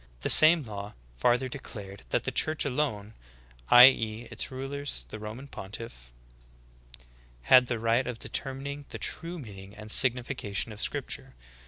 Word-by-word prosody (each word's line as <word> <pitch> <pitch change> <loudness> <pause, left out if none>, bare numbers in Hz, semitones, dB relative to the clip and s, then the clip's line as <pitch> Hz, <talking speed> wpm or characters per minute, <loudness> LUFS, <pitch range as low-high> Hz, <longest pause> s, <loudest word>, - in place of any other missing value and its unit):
The - - 0
same 160 0 +8
law 105 -3 -8 0.2
farther 120 - +1
declared 100 - -10
that - - -1
the - - -3
church 155 -1 +1
alone 125 -7 -3 0.6
(i. 125 0 +10
e. 115 -2 -5
its 115 - -4
ruler, 135 +2 -6 0.3
the 110 - -8
Roman 110 +6 -9
pontiff) 95 - -10 1.3
had 125 - +5
the 120 - -2
right 115 +3 0
of 125 -2 -5
determining 140 +4 -5
the - - -7
true 170 +1 -2
meaning 100 - -11
and 105 0 -6
signification 125 -5 +1
of 105 0 -7
scripture. - - -2
120 Hz, 145 wpm, -27 LUFS, 105-135 Hz, 1.3 s, i